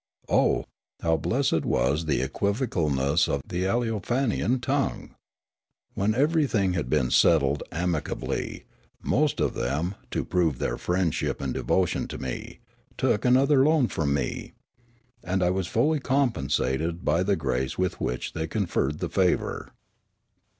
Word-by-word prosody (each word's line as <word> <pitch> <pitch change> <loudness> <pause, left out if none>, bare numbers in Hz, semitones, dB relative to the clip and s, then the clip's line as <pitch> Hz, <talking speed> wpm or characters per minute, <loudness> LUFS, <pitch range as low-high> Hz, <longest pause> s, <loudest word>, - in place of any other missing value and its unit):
Oh, - - +2 0.4
how 80 -1 +2
blessed 85 - 0
was 70 +7 +1
the 75 - +1
equivocalness 80 - 0
of 70 -1 -1
the 90 +1 -2
Aleofan 115 +3 0
ian 125 +2 0
tongue! 135 +3 -2 0.8
When 100 +2 +1
everj'thing 135 - +2
had 75 -8 -2
been 60 - +1
settled 70 -4 +4
amicably, 85 -7 -3 0.4
most - - +1
of - - +1
them, 75 +9 -1 0.2
to - - -2
prove 85 -7 +1
their - - -2
friendship 90 -3 -1
and 70 -1 -3
devotion 90 -2 0
to - - -7
me, - - -6 0.4
took 105 - +1
another 130 +2 +5
loan 150 -4 +3
from 75 -3 -1
me. 70 -4 -2 0.7
And 90 +1 0
I 90 - +3
was 95 -1 -1
fully 145 - +2
compensated 85 - 0
by 85 +4 +2
the 100 +2 +2
grace 65 -4 -2
with 90 -2 -1
which 60 - -3
they 80 0 -3
conferred 80 -6 -1
the 90 - 0
favour. 90 0 0
90 Hz, 135 wpm, -26 LUFS, 75-115 Hz, 0.8 s, another